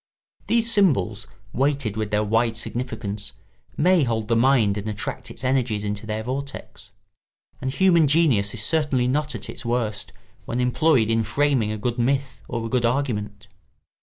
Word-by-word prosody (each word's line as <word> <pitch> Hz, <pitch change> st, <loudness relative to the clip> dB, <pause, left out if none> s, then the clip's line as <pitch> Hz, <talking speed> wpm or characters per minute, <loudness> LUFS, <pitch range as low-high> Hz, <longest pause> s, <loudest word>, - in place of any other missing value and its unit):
These 230 Hz, 0 st, +2 dB
symbols, 170 Hz, -, +2 dB, 0.3 s
weighted 135 Hz, -5 st, 0 dB
with 110 Hz, -1 st, -2 dB
their 105 Hz, 0 st, +1 dB
wide 115 Hz, +2 st, +1 dB
significance, 110 Hz, -4 st, -4 dB, 0.4 s
may 180 Hz, +2 st, +4 dB
hold 110 Hz, -3 st, -1 dB
the 115 Hz, -, +3 dB
mind 115 Hz, -4 st, +3 dB
and 105 Hz, +1 st, -4 dB
attract 105 Hz, -1 st, -5 dB
its -, -, -9 dB
energies 125 Hz, -5 st, 0 dB
into 105 Hz, +1 st, -4 dB
their 110 Hz, 0 st, -3 dB
vortex; 135 Hz, +3 st, -6 dB, 0.7 s
and 130 Hz, -, -1 dB
human 170 Hz, 0 st, +4 dB
genius 135 Hz, -10 st, +3 dB
is 110 Hz, -, -1 dB
certainly 140 Hz, -3 st, +1 dB
not 150 Hz, +3 st, 0 dB
at -, -, -7 dB
its -, -, -8 dB
worst 115 Hz, -4 st, -1 dB, 0.3 s
when 120 Hz, -, -3 dB
employed 125 Hz, -2 st, +2 dB
in 115 Hz, 0 st, +2 dB
framing 120 Hz, 0 st, +1 dB
a 110 Hz, -, -3 dB
good 120 Hz, +3 st, -2 dB
myth 135 Hz, +2 st, 0 dB
or 115 Hz, -2 st, -3 dB
a -, -, -4 dB
good 125 Hz, 0 st, +1 dB
argument. 120 Hz, -4 st, -1 dB
120 Hz, 165 wpm, -23 LUFS, 110-140 Hz, 0.7 s, may